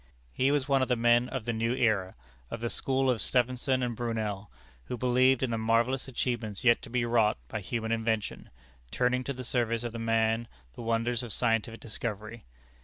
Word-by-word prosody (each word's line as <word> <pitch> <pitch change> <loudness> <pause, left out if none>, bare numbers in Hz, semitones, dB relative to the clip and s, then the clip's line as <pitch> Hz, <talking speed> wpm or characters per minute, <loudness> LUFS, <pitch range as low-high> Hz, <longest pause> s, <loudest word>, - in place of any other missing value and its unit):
He 130 - +2
was 145 -2 +1
one 135 -1 +3
of 130 - +1
the 125 - +2
men 120 +1 +3
of 130 -5 -4
the 120 - -1
new 115 +2 0
era 110 -7 +1 0.3
of - - -5
the 120 0 -2
school 135 0 0
of 125 -4 +2
Stephenson 130 +1 +1
and 120 -1 -2
Brunel 110 -4 -3 0.4
who 125 - -4
believed 130 +2 +3
in 125 - 0
the 115 - -1
marvellous 115 +4 +1
achievements 120 -5 -2
yet 120 -1 +5
to - - -9
be 120 0 0
wrought 115 -2 +3
by 110 - -4
human 110 +3 -3
invention, 110 -1 -1 0.4
turning 125 - +1
to 140 - -2
the 130 0 -7
service 115 -2 0
of 120 -1 -4
man 115 0 +1 0.3
the - - -9
wonders 115 +1 0
of 120 -3 -6
scientific 115 -1 0
discovery. 110 0 -5
120 Hz, 190 wpm, -29 LUFS, 115-125 Hz, 0.4 s, yet